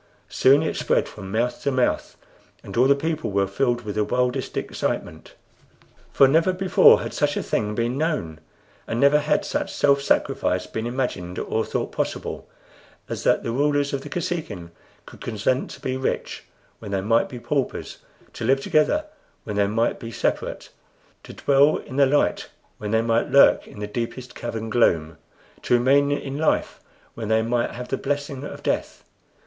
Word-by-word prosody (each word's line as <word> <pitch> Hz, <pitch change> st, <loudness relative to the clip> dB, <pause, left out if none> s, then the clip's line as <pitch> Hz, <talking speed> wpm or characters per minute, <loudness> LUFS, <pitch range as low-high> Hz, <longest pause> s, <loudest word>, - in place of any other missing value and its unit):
Soon 130 Hz, +9 st, +4 dB
it 160 Hz, -, -2 dB
spread -, -, +1 dB
from 95 Hz, -3 st, -9 dB
mouth 120 Hz, +4 st, -1 dB
to -, -, 0 dB
mouth, 130 Hz, -2 st, 0 dB, 0.5 s
and -, -, -9 dB
all 125 Hz, +3 st, +4 dB
the 140 Hz, -, +5 dB
people 155 Hz, +2 st, -2 dB
were 100 Hz, 0 st, +1 dB
filled 120 Hz, +5 st, 0 dB
with 105 Hz, -3 st, -5 dB
the 105 Hz, -, +1 dB
wildest 125 Hz, +3 st, -1 dB
excitement. -, -, -4 dB, 0.8 s
For 135 Hz, -, +6 dB
never 165 Hz, +6 st, +3 dB
before 185 Hz, 0 st, +5 dB
had -, -, -5 dB
such 145 Hz, 0 st, 0 dB
a -, -, -1 dB
thing 105 Hz, 0 st, -1 dB
been 120 Hz, +4 st, -1 dB
known, 150 Hz, -, -2 dB, 0.5 s
and 115 Hz, -, -2 dB
never 140 Hz, +2 st, +5 dB
had 150 Hz, +1 st, 0 dB
such -, -, -2 dB
self 140 Hz, -1 st, +3 dB
sacrifice 90 Hz, -8 st, 0 dB
been 110 Hz, +1 st, -4 dB
imagined 120 Hz, -8 st, -3 dB
or 110 Hz, -, -1 dB
thought -, -, -3 dB
possible, -, -, -4 dB, 0.6 s
as -, -, -4 dB
that -, -, +3 dB
the 115 Hz, -, -2 dB
rulers 145 Hz, +2 st, +1 dB
of 140 Hz, -, -1 dB
the 145 Hz, -, -9 dB
Kosekin 145 Hz, -, -4 dB, 0.3 s
could -, -, -14 dB
consent 120 Hz, +3 st, -1 dB
to -, -, -10 dB
be 130 Hz, -, -3 dB
rich 130 Hz, -, -3 dB, 0.3 s
when 105 Hz, -, -8 dB
they 100 Hz, -1 st, -1 dB
might 115 Hz, +4 st, +2 dB
be 125 Hz, -, -7 dB
paupers; 135 Hz, +2 st, -3 dB, 0.3 s
to -, -, -7 dB
live 135 Hz, +1 st, +3 dB
together 225 Hz, -, +2 dB, 0.4 s
when 105 Hz, -, -5 dB
they 100 Hz, -1 st, +2 dB
might 115 Hz, +3 st, 0 dB
be 115 Hz, -, -7 dB
separate; -, -, -2 dB, 0.5 s
to -, -, -11 dB
dwell 140 Hz, +2 st, +3 dB
in 130 Hz, -, -8 dB
the 140 Hz, -1 st, +5 dB
light 145 Hz, +2 st, +1 dB, 0.3 s
when 105 Hz, -, -4 dB
they 110 Hz, +1 st, +2 dB
might 115 Hz, 0 st, +1 dB
lurk 140 Hz, -, +5 dB
in -, -, -12 dB
the 105 Hz, -, -3 dB
deepest 120 Hz, +3 st, -5 dB
cavern 115 Hz, -1 st, -5 dB
gloom; 80 Hz, -9 st, +2 dB, 0.4 s
to -, -, +2 dB
remain 140 Hz, +4 st, +3 dB
in 140 Hz, 0 st, -3 dB
life 160 Hz, -, 0 dB, 0.3 s
when 115 Hz, -2 st, -6 dB
they 110 Hz, +1 st, +2 dB
might 120 Hz, +1 st, 0 dB
have 125 Hz, +1 st, -8 dB
the 135 Hz, -, -1 dB
blessing 145 Hz, -1 st, -3 dB
of -, -, -8 dB
death. -, -, -2 dB
125 Hz, 180 wpm, -23 LUFS, 110-140 Hz, 0.8 s, For